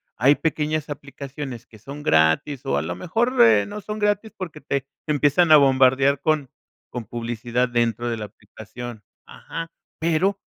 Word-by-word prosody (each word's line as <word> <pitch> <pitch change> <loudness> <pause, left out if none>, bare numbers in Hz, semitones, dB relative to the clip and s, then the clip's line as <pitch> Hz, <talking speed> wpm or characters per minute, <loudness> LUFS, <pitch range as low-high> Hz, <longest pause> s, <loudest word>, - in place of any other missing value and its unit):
Hay 135 +6 +4
pequeñas 155 -1 -1
aplicaciones 140 -3 -7
que 110 - -17
son 140 +6 -9
gratis, 80 - +2
o, 70 - 0
a 70 - +1
lo - - -4
mejor, 235 +8 0
eh, 110 -3 +6
no 210 - -7
son 210 +2 -5
gratis 210 +1 0
porque 165 -5 -7
te 140 -1 -1 0.2
te 155 - -1
empiezan 150 +3 +3
a 155 - +10
bombardear 135 0 +4
con 155 -4 0 0.4
con 120 -3 -6
publicidad 120 +1 -2
dentro 120 -1 0
de 115 - -2
la 105 - -5
aplicación. 110 +2 -10 0.2
Ajá. 165 0 -8 0.3
Pero, 170 +5 +1
140 Hz, 165 wpm, -23 LUFS, 120-155 Hz, 0.4 s, a